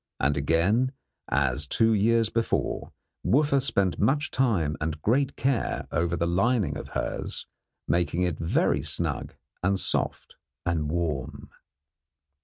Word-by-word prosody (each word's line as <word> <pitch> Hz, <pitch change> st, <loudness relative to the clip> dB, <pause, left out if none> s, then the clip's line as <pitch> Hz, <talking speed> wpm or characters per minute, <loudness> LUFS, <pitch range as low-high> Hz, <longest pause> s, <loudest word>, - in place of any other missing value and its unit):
And 70 Hz, +2 st, +2 dB
again, 90 Hz, -, +2 dB, 0.4 s
as 70 Hz, +1 st, +1 dB
two 115 Hz, +8 st, +3 dB
years 115 Hz, +1 st, +3 dB
before, 115 Hz, 0 st, -1 dB, 0.3 s
Wooffa 140 Hz, 0 st, +3 dB
spent 100 Hz, -9 st, +1 dB
much 145 Hz, +7 st, +1 dB
time 100 Hz, -, +1 dB
and 80 Hz, 0 st, -2 dB
great 135 Hz, +5 st, +2 dB
care 135 Hz, -3 st, -1 dB
over 85 Hz, +1 st, 0 dB
the 85 Hz, -, 0 dB
lining 100 Hz, +5 st, +1 dB
of -, -, -6 dB
hers, -, -, -3 dB, 0.4 s
making 85 Hz, 0 st, +1 dB
it 90 Hz, -4 st, -1 dB
very 80 Hz, +1 st, +1 dB
snug -, -, -2 dB, 0.3 s
and 95 Hz, +1 st, +1 dB
soft -, -, -1 dB, 0.3 s
and 80 Hz, -3 st, 0 dB
warm. 75 Hz, -5 st, -3 dB
90 Hz, 125 wpm, -27 LUFS, 80-115 Hz, 0.4 s, two